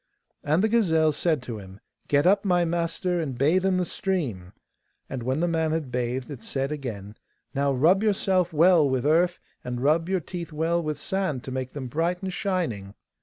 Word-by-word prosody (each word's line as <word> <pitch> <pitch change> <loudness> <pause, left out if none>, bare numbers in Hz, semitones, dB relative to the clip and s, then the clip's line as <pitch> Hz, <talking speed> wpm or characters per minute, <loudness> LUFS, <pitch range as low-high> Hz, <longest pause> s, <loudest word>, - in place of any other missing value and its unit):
And 155 +6 +2
the - - +4
gazelle 165 -9 +3
said 155 -2 0
to 115 -3 -6
him, 95 0 -12 0.3
'Get 145 +1 +3
up, 195 +2 +4
my 180 -3 +2
master, 170 +1 -1
and 135 -6 -4
bathe 160 +8 +3
in 190 -1 +2
the 180 - +1
stream!' 135 - -3 0.6
and 130 - -5
when 130 +6 -1
the 175 - +2
man 160 -2 0
had 155 -6 -3
bathed 125 +2 -2
it 135 -5 -8
said 135 +5 -3
again, 110 -9 -5 0.4
'Now 140 0 +1
rub 165 +9 +4
yourself 190 -4 +1
well 165 -1 +5
with 130 -1 -1
earth, 170 +4 +3 0.3
and 125 -1 -4
rub 155 +6 +2
your 190 -1 +1
teeth 170 0 -7
well 165 +3 0
with 155 -3 -3
sand 155 -6 -2
to 130 - -7
make 130 0 -4
them 140 -3 -5
bright 170 +8 -1
and 190 -1 -3
shining. 140 - -2
155 Hz, 195 wpm, -26 LUFS, 130-180 Hz, 0.6 s, well